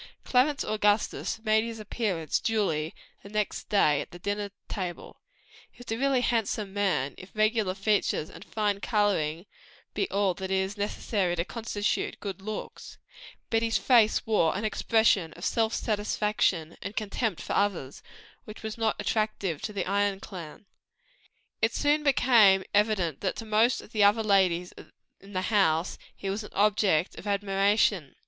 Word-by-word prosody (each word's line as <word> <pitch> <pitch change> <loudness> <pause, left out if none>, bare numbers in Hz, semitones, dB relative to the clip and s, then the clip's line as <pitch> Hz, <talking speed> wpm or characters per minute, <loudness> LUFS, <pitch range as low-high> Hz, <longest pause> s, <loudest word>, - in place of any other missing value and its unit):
Clarence 270 +3 +2
Augustus 210 +1 0
made 220 0 +3
his 230 -1 -6
appearance 200 -7 -2
duly 170 -9 -1 0.3
the 200 - -12
next 210 0 -3
day 150 -8 +3
at - - -8
the 175 - -11
dinner 205 +3 -3 0.2
table; 180 -4 -6 0.6
a 245 -2 -4
really 265 +1 +1
handsome 215 -4 -1
man, 185 -10 0
if 185 - -11
regular 215 -3 +1
features 200 -6 0
and - - -12
fine 210 -2 -1
coloring 195 -7 0 0.5
be 390 - -1
all 200 -2 +1
that 190 +1 -6
is 190 +1 0
necessary 200 -3 -1
to 170 0 -1
constitute 220 -2 -2
good 195 -2 -6
looks; 215 +2 -7 0.5
but 225 0 +2
his 230 -1 +1
face 230 -4 +4
wore 200 -6 +2
an 210 - -3
expression 215 -6 +2
of 175 - -8
self 225 -1 +1
satisfaction 210 -6 0
and 200 - -6
contempt 215 -2 -2
for - - -4
others, 185 -10 -1 0.4
which 215 +1 -11
was 220 +1 -5
not 225 -1 +1
attractive 215 -7 -1
to 205 -3 -3
our 195 - -1
Ion 200 -1 +1
friends. 180 -2 -9 1.0
But - - +5
it - - -7
soon 295 +1 +2
became 235 -9 +5
evident 205 -8 +2
to 200 - -2
them, - - +4
that - - -6
to 225 - -7
most 220 +3 +2
of - - -16
the 215 -3 +2
other 210 +2 +4
ladies 185 -4 +2 0.5
in 200 +1 -14
the 185 0 -1
house, 165 -4 +2 0.2
he 195 - -7
was 200 +3 -2
an - - -12
object 200 -5 +2
of 210 - -9
admiration. 200 -4 +1
205 Hz, 160 wpm, -28 LUFS, 190-220 Hz, 1.0 s, But